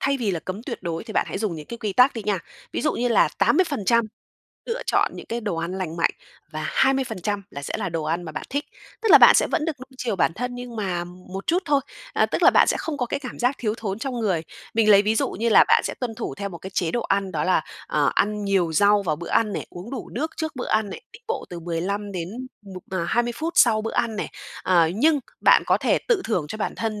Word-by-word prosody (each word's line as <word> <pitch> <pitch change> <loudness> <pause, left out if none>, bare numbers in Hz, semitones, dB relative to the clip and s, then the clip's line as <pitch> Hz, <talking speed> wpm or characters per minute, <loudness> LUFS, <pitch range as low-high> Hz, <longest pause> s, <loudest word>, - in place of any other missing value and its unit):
thay 275 0 +1
vì 220 -5 0
là 170 -3 -2
cấm 190 +4 -6
tuyệt - - -6
đối 170 +2 -3
thì 220 - -8
bạn - - +1
hãy - - -4
dùng 200 -5 -1
những 150 -2 -8
cái 235 - -7
quy 210 -4 -2
tắc 250 +4 +5
đi 225 - -4
nha, 205 -2 +1 0.3
ví - - -2
dụ 305 - +2
như 245 +1 0
là 230 - +4
80% 235 - +3 0.6
lựa 475 +1 -3
chọn - - +2
những - - -9
cái 235 +1 -3
đồ 205 -6 -2
ăn 170 +2 -3
lành 170 -3 -4
mạnh, 165 - +2 0.4
và - - -4
20% 225 -7 0
là 140 - -7
sẽ - - -5
là 195 - -2
đồ 165 -2 -3
ăn 165 +3 -1
mà 160 - -7
bạn - - -6
thích, 285 +1 -1 0.4
tức 450 - +1
là - - +11
bạn - - +9
sẽ - - +4
vẫn 305 - -1
được 310 -6 -3
nuông 260 +1 -12
chiều 230 -6 -2
bản 165 - +2
thân 245 +3 -4
nhưng 245 -2 -7
mà 180 -4 -2
một 185 +2 -9
chút 355 +3 +2
thôi, 285 -1 +3 0.3
à, - - +3
tức - - -2
là - - +8
bạn - - +5
sẽ - - +2
không 315 -3 -3
có 245 - 0
cái 280 +4 -3
cảm 255 - -8
giác 250 +3 +2
thiếu 215 -2 -1
thốn 200 -2 -3
trong 265 +1 -4
người. 185 -7 0 0.3
Mình 220 -1 +4
lấy 200 0 +8
ví 215 +2 +1
dụ - - 0
như 230 +4 -1
là - - +7
bạn - - +5
sẽ - - -2
tuân 240 -3 -3
thủ 230 - -5
theo 200 0 -4
một 170 -3 -9
cái 190 - -8
chế 175 -3 -1
độ 240 - -1
ăn, 195 -1 0
đó - - -1
là, - - +3 0.2
ờ, - - +2
ăn 210 0 +1
nhiều 185 -5 +1
rau 205 +4 +4
vào 155 -5 -1
bữa 170 - -7
ăn 215 -2 +2
này, - - -4
uống 180 +7 -9
đủ 260 -4 -6
nước 310 +7 -2
trước 315 -4 -4
bữa 250 - -4
ăn 215 -2 +1
này, - - -8
đi 460 - -12
bộ 460 - -2
từ 175 -1 -6
15 195 +5 -3
đến 175 -2 -4 0.3
1 190 -2 -9
mà 185 -3 -1
20 240 +6 +1
phút 330 +5 -2
sau 220 -3 +5
bữa 225 - -3
ăn 225 -2 0
này. - - -3 0.4
À, 170 -3 +4
nhưng 295 +5 +3 0.2
bạn - - +6
có - - +3
thể - - +2
tự 425 -6 +3
thưởng 180 -9 0
cho 215 - -6
bản - - -2
thân 215 -2 -3
215 Hz, 275 wpm, -24 LUFS, 185-245 Hz, 0.6 s, là